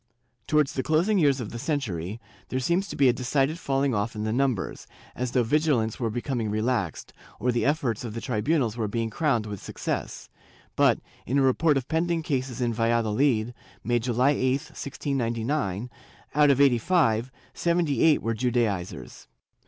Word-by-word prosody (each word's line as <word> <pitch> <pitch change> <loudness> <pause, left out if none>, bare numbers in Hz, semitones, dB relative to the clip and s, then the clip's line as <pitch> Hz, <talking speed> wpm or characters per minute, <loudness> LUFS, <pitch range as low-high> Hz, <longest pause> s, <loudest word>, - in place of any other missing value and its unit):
Towards 150 -2 +2
the 130 - -1
closing 170 +8 +2
years 140 -4 +3
of 115 -4 -5
the 120 - -6
century, 110 - -3 0.3
there 130 - -1
seems 170 +9 0
to - - -6
be 140 - +4
a 125 - +5
decided 135 +6 0
falling 135 -2 0
off 105 +1 -1
in 105 - -3
the 110 0 -1
numbers, 125 -6 -1 0.3
as 125 0 -2
though 125 0 +2
vigi 150 +6 +2
lance 110 -3 -1
were 115 -3 0
becoming 120 -1 -2
relaxed, 110 -4 -2 0.3
or 125 - +1
the 120 +2 0
efforts 140 -8 0
of 115 -2 -6
the - - -3
tribunals 125 +1 0
were 115 -3 -1
being 115 +1 -2
crowned 120 -5 +1
with 105 -3 -6
success; - - -4 0.5
but, - - +4 0.3
in 135 - +1
a 140 - +4
report 145 +3 +3
of 130 -1 -3
pending 165 0 0
cases 130 -5 -2
in 120 -1 +1
Valladolid, 115 +1 +1 0.3
made 120 0 +1
July 125 +3 +2
8, 130 -2 +1 0.2
1699, 120 -4 -2 0.4
out 150 0 +5
of 140 -1 +3
eighty 135 -4 +5
five, 120 -6 +2 0.2
seventy 170 -6 +1
eight 160 -2 +4
were 115 - 0
Judaizers. 110 -6 -2
125 Hz, 175 wpm, -26 LUFS, 115-140 Hz, 0.5 s, a